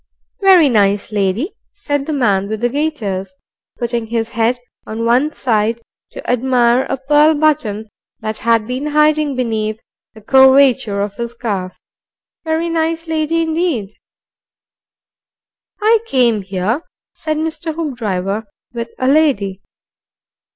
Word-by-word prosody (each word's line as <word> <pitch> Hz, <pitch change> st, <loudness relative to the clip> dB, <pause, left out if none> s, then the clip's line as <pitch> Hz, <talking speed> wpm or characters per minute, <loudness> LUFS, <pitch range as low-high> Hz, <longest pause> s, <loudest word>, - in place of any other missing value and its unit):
"Very 375 Hz, -5 st, +6 dB
nice 205 Hz, -4 st, +1 dB
lady," 210 Hz, -, 0 dB, 0.2 s
said 290 Hz, -9 st, -3 dB
the -, -, -2 dB
man 205 Hz, -9 st, +1 dB
with 220 Hz, -1 st, -4 dB
the 240 Hz, -, +2 dB
gaiters, 210 Hz, -10 st, -3 dB, 0.4 s
putting 235 Hz, -1 st, -2 dB
his 225 Hz, 0 st, -2 dB
head 230 Hz, +2 st, 0 dB, 0.3 s
on 225 Hz, +1 st, -3 dB
one 250 Hz, +6 st, +2 dB
side 225 Hz, -4 st, 0 dB, 0.3 s
to -, -, -10 dB
admire 250 Hz, 0 st, +2 dB
a -, -, -1 dB
pearl 295 Hz, +4 st, +4 dB
button 285 Hz, -9 st, 0 dB, 0.3 s
that 215 Hz, 0 st, -4 dB
had 230 Hz, -1 st, +2 dB
been 255 Hz, +5 st, -3 dB
hiding 300 Hz, -1 st, +2 dB
behind 220 Hz, -3 st, -2 dB, 0.4 s
the 220 Hz, -, -13 dB
curvature 265 Hz, -3 st, +4 dB
of 200 Hz, 0 st, -4 dB
his 235 Hz, 0 st, -4 dB
calf. 200 Hz, -6 st, -4 dB, 0.7 s
"Very 320 Hz, +1 st, -1 dB
nice 330 Hz, 0 st, -1 dB
lady 320 Hz, +1 st, 0 dB
indeed." 320 Hz, -, -1 dB, 1.9 s
"I 445 Hz, +1 st, +4 dB
came 240 Hz, -, +2 dB
here," 195 Hz, -, -2 dB, 0.3 s
said 310 Hz, -1 st, -3 dB
Mr. 320 Hz, 0 st, -3 dB
Hoopdriver, 220 Hz, -, -3 dB, 0.3 s
"with 235 Hz, -1 st, -5 dB
a 255 Hz, -, -1 dB
lady." 260 Hz, -10 st, +2 dB
245 Hz, 125 wpm, -17 LUFS, 215-305 Hz, 1.9 s, Very